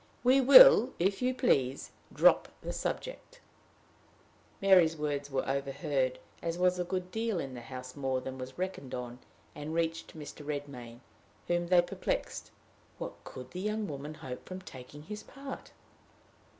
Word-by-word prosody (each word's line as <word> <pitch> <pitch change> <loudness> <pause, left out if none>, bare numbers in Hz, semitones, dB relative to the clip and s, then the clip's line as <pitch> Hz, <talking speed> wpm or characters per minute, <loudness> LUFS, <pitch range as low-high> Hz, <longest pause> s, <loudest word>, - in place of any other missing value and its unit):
"We 260 +2 +5
will, 280 - +9
if 195 +5 0
you 255 0 +1
please, 135 - +1 0.2
drop - - +5 0.2
the - - -4
subject." - - -5 1.2
Mary's 180 -5 +5
words 145 -1 -2
were 135 -1 -2
overheard, 135 -1 -1 0.2
as 170 0 -2
was 180 0 +2
a - - +1
good 185 0 -4
deal 225 -3 -1
in 135 -4 -5
the 120 - -7
house 130 +1 -8
more 135 -2 -1
than 130 0 -7
was 130 +1 -8
reckoned 185 -8 -4
on, 125 0 -6 0.3
and 150 +2 -6
reached 165 -1 -2
Mr. 150 0 -9
Redmain, 140 -5 -6 0.5
whom 175 0 0
they 175 -1 +5
perplexed: - - -3 0.5
what - - -5
could 130 0 -10
the 180 - -5
young 210 +1 -1
woman 145 +1 -6
hope 125 -4 -8
from 185 0 -7
taking 145 -2 -11
his 210 +5 -7
part? 275 -1 -9
155 Hz, 150 wpm, -31 LUFS, 135-190 Hz, 1.2 s, will